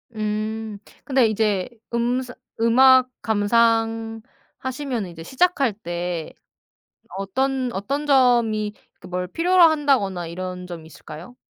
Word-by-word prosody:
음. 215 0 -3 0.3
근데 260 -4 +3
이제 210 -3 0 0.2
음스 245 +2 -1 0.3
음악 255 +2 +6
감상하시면은 225 +2 -1
이제 165 -1 -10
시작할 275 - +1
때 175 -4 -5 0.8
어떤 255 +6 -1
어떤 275 +10 -3
점이 235 -6 +3 0.3
그 - - -12
뭘 180 0 -3
필요로 355 - +3
한다거나 275 - +3
이런 180 +1 -6
점이 170 -3 -8
있을까요? 160 +8 -12
225 Hz, 230 characters per minute, -22 LUFS, 195-260 Hz, 0.8 s, 음악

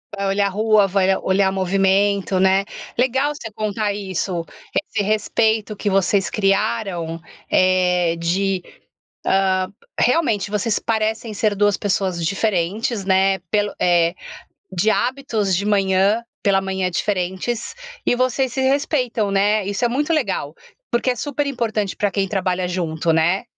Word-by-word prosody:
Vai 200 0 -3
olhar 200 +1 +2
rua, 215 0 +3
vai 195 0 +2
a 190 - +1
olhar 190 0 +2
movimento, 195 +1 +1
né. 190 +1 +4 0.3
Legal 265 +4 +1
você 225 -6 -8
contar 215 0 -2
isso, 185 -3 -3 0.4
esse 215 -2 -1
respeito 215 +1 +1
que 205 - -2
vocês 195 0 +2
criaram, 195 -5 0 0.3
eh, 180 -2 +3
de 185 +2 0 0.6
hã, 190 -1 +2 0.3
realmente 245 -8 +2
vocês 210 +1 0
parecem 220 0 -1
ser 210 0 0
duas 205 0 +2
pessoas 185 -4 -1
diferentes, 200 +3 -1
né, 190 0 +3
pelo 205 -1 +1
eh, 175 -1 +3 0.6
de 185 +5 +1
hábitos 225 -6 0
de 200 - -1
manhã 200 +2 +2 0.2
pela 195 -2 +3
manhã 190 -1 -2
diferentes 190 - -2 0.3
e - - +2
vocês 255 +1 0
se 265 - -2
respeitam, 260 -5 +1
né, 205 +2 +2
isso 200 +4 -1
é - - +4
muito 290 +7 -1
legal, 310 +8 -1 0.4
porque 240 +2 +1
é - - -3
super 290 +3 -2
importante 225 -7 -2
pra 205 - 0
quem 195 0 -1
trabalha 185 -2 -1
junto, 170 -2 -1
né. 170 +6 +2
200 Hz, 140 wpm, -20 LUFS, 190-220 Hz, 0.6 s, né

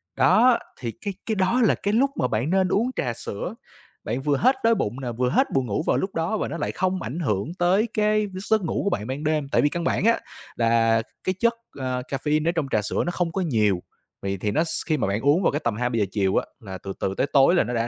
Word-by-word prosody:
Đó, 250 -1 +5 0.2
thì 120 -3 -3
cái 200 -2 -3
cái 220 - -1
đó 205 +6 +2
là 220 - +4
cái 205 +1 -2
lúc 270 +5 +3
mà 125 - 0
bạn 120 +5 -1
nên 190 0 +3
uống 230 +7 +1
trà 120 -3 -1
sữa. 110 -3 -5 0.5
Bạn 120 +5 -2
vừa 145 0 +1
hết 260 +3 +4
đói 230 0 +4
bụng 120 - -2
nè, 125 -2 -3
vừa 125 +2 0
hết - - +3
buồn 135 -2 +1
ngủ 105 +5 -2
vào - - +3
lúc 190 - -3
đó, 165 +7 0
và - - -2
nó - - -5
lại - - -2
không 185 0 -1
ảnh 130 +10 -4
hưởng 110 - -1
tới 190 +6 +3
cái 215 0 +2 0.2
giấc 220 -2 +4
ngủ 170 - -1
của 200 - +1
bạn 105 - -2
ban 135 +3 -4
đêm. 155 -2 0
Tại - - +3
vì 145 - +3
căn 170 +3 -3
bản 185 - 0
á, 230 - +4 0.4
là 115 -1 +3 0.2
cái 185 - -1
chất, 235 0 +3 0.3
à, 130 -1 -2
caffeine 150 +4 -1
ở - - +3
trong 165 -5 -2
trà 105 - +2
sữa 105 - -1
nó 175 - -1
không 175 -2 -1
có 190 - -2
nhiều, 105 - +1 0.4
vậy 100 0 -2
thì 105 - 0
nó 155 - +2
s - - -5 0.2
khi 155 - +1
mà 125 - 0
bạn 100 +3 -1
uống 145 +8 +3
vào - - +2
tầm 120 -3 0
2:00-3:00 115 -2 0
chiều 95 -3 +1
á, - - +1
là 95 -6 -8
từ 95 +1 -7
từ 95 - -1
tới - - +1
tối 140 +5 +6
là - - +4
nó 120 - -4
đã 115 0 0
145 Hz, 270 wpm, -24 LUFS, 115-185 Hz, 0.5 s, tối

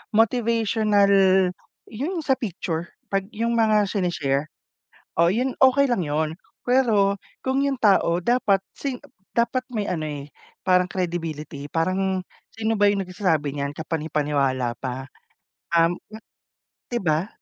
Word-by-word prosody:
motivational 220 -3 +3 0.8
'yon 295 - -3
sa 265 -2 +2
picture, 170 -6 -3 0.3
'pag 195 -1 0
yung 230 +2 0
mga 215 -2 +4
shine-share. 155 -7 -1 0.7
Oh, 170 - +5
'yon 250 +5 0
okey 265 +2 +6
lang 240 -6 +1
'yon, 155 +1 -1 0.3
pero, 225 -6 +3 0.3
kung 265 +1 +1
yung 280 -1 0
tao 195 -6 +4
dapat 235 -3 +3 0.2
sing 270 -3 -3
ep - - -18 0.3
dapat 235 +2 +2
may 215 -4 -2
ano, 170 -3 -2
eh, 145 -1 -6 0.4
parang 180 -1 +4
credibility. 160 -5 -4
Parang 185 +3 0 0.3
sino 225 0 0
ba 205 - +6
yung 200 -1 0
nagsasabi 180 -7 0
niyan? 140 -1 -2
Kapanipaniwala 145 -6 -1
pa, 130 0 -4 0.7
um, 165 +1 +4
hmm, 220 +1 -13 0.7
'di 240 - -1
ba? 160 +2 +1
195 Hz, 130 wpm, -24 LUFS, 160-225 Hz, 0.8 s, okey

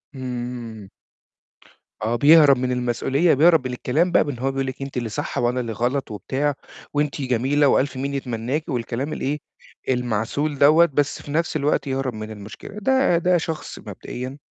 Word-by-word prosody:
إمم. 120 -5 -6 1.1
آه 110 +2 0
بيهرب 145 +1 +7
من 125 0 -1
المسؤولية، 125 +6 +1
بيهرب 160 -1 +4
من 125 - -5
الكلام 155 +8 0
بقى - - +5
من 145 - -3
إن 120 - -10
هو 135 +2 0
بيقول 135 0 -2
لِك: 130 +1 -6
"أنتِ 135 -1 -5
اللي 120 -2 -2
صح، 105 - -4
وأنا 120 +1 +1
اللي 120 -2 -3
غلط 120 +5 -1
وبتاع، 135 +7 -1 0.4
وأنتِ 145 0 -1
جميلة 135 +3 +2
وألْف 135 0 +2
مين 140 +2 -3
يتمناكي." 135 +4 -3
والكلام 125 +4 -3
الإيه، 145 +3 -2 0.5
المعسول 125 +4 -1
دوَّة، 155 +5 +6
بس 145 -2 -1
في 145 - -9
نفْس 165 +2 0
الوقت 145 -1 0
يهرب 135 -1 -2
من 110 0 -7
المشكلة، 105 0 -10
ده 265 -5 +3
ده 180 +1 +3
شخص 160 -1 -5
مبدئيًا 130 +2 -7
135 Hz, 170 wpm, -22 LUFS, 120-145 Hz, 1.1 s, بيهرب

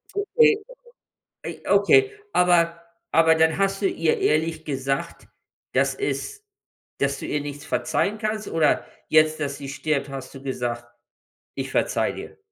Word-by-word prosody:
Okay, 435 +2 +4 0.9
ey - - -7
okay, 410 -1 +5 0.2
aber 170 -1 +3 0.3
aber 160 0 +5
dann 160 0 +3
hast 195 0 0
du 195 - +3
ihr 165 -3 +1
ehrlich 160 +1 0
gesagt, 135 -1 -3 0.5
dass - - +2
es 415 +1 -4 0.6
dass 140 0 0
du - - -6
ihr 150 - -1
nichts 145 0 -7
verzeihen 195 - 0
kannst 215 -1 -2
oder 160 -2 +2 0.2
jetzt, 155 0 +4
dass 140 -1 -2
sie 140 - -8
stirbt, 140 0 -2
hast 135 -1 -7
du 135 - -10
gesagt: 120 -3 -3 0.7
„Ich - - -4
verzeihe - - 0
dir“? - - -9
160 Hz, 145 wpm, -24 LUFS, 140-195 Hz, 0.9 s, okay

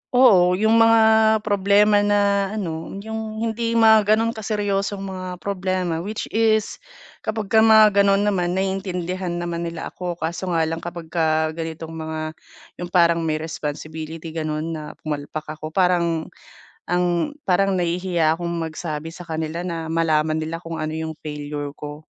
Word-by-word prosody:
Oo, 185 -8 +6
yung 220 +3 +4
mga 225 0 +6 0.4
problema 205 0 +4
na 200 -1 +2
ano, 165 -5 -4
yung 220 0 -5
hindi 230 +1 -1
mga 220 -2 +6
gano'n 225 +1 0
ka 220 - -8
seryosong 200 -1 -1
mga 185 -1 -6
problema, 185 -3 -2
which 210 +4 -4
is 220 -1 +1 0.4
kapagka 220 0 +1
mga 215 -2 +6
gano'n 200 0 +3
naman 180 -3 0
naiintindihan 185 -2 -2
naman 170 -1 -3
nila 170 - -7
ako, 175 -2 -4
kaso 170 +3 -3
nga 165 -2 +2
lang 165 +1 -3
kapagka 160 -2 -1
ganitong 165 0 -6
mga 155 -1 -5 0.5
yung 175 - -4
parang 170 -1 +4
may 155 -1 0
responsibility 155 +1 -6
gano'n 155 -1 -2
na 155 -1 -5
pumalpak 150 0 -5
ako, 155 0 -7
parang 170 -2 +1 0.6
ang 175 - +1 0.2
parang 195 +2 +3
nahihiya 175 -2 +1
akong 170 0 -4 0.2
magsabi 155 -1 -5
sa 175 - -9
kanila 160 +1 -4
na 165 -2 -4
malaman 160 -1 +1
nila 160 +1 -3
kung 165 -1 -6
ano 155 0 -3
yung 160 0 -4
failure 145 -1 -5
ko. 150 +1 -8
175 Hz, 145 wpm, -22 LUFS, 160-200 Hz, 0.6 s, Oo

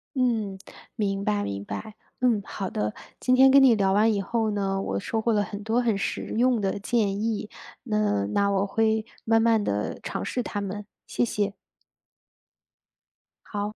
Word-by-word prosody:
嗯， 225 -7 0 0.4
明 200 -3 -1
白 105 - 0
明 100 0 -4
白。 215 - -6 0.2
嗯， 240 -4 +2
好 195 0 -5
的， 105 0 -2 0.3
今 255 0 +3
天 265 +1 +7
跟 275 0 +7
你 255 -4 +7
聊 195 -2 +2
完 215 +3 +4
以 205 - 0
后 220 +2 0
呢， 195 -1 -1
我 - - -2
收 220 +2 -2
获 230 - +1
了 205 - +2
很 205 +1 -6
多 225 +3 +1
很 230 -4 +1
实 - - -2
用 245 0 +3
的 200 0 -1
建 205 -2 0
议， 220 -2 -1 0.4
嗯， 105 - +1
那 200 0 +2
我 195 0 +1
会 220 +1 +1 0.2
慢 225 0 +3
慢 225 -1 +3
地 105 - -2
尝 - - -4
试 250 - -2
它 205 -3 -4
们， 200 +1 -5 0.2
谢 - - -1
谢。 205 -3 -1 1.9
好。 205 -1 -3
210 Hz, 190 characters per minute, -26 LUFS, 195-225 Hz, 1.9 s, 天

